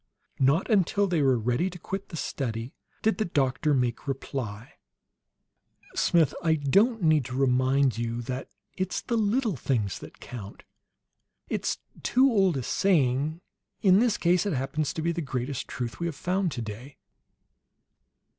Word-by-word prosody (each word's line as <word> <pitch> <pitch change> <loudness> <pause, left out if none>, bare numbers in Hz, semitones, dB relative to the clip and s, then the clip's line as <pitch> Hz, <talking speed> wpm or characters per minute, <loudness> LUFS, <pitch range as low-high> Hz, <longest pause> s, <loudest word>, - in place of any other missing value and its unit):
Not 140 +7 +3
until 205 -2 +3
they 175 -5 +1
were 135 -3 +4
ready 125 - 0
to 180 - -9
quit 195 +3 -5
the 165 - -6
study 120 -4 -3 0.3
did 220 +1 +2
the 215 - +1
doctor 140 -2 +1
make 125 +1 -1
reply. 125 -5 -4 1.2
"Smith, 165 -4 +3
I 160 -2 +3
don't 195 - +2
need 155 -3 +4
to 125 - -5
remind 130 -1 +2
you 115 +1 -2
that 130 +3 -4 0.3
it's 185 -1 -2
the 235 - -2
little 220 -1 +1
things 115 -8 -1
that - - -12
count. 105 -5 -9 0.9
It's - - -1 0.2
too 265 +2 +4
old 195 -8 +3
a 130 - -3
saying. 150 -1 +1 0.4
In 190 -1 +6
this 235 -2 +2
case 180 +3 +2
it 200 - 0
happens 140 +2 -1
to 160 - -4
be 170 - +1
the 170 0 -3
greatest 130 -2 -3
truth 120 -2 -5
we 170 - -1
have 165 - -4
found 180 +3 0
today. 120 +3 -7
145 Hz, 155 wpm, -27 LUFS, 125-185 Hz, 1.2 s, In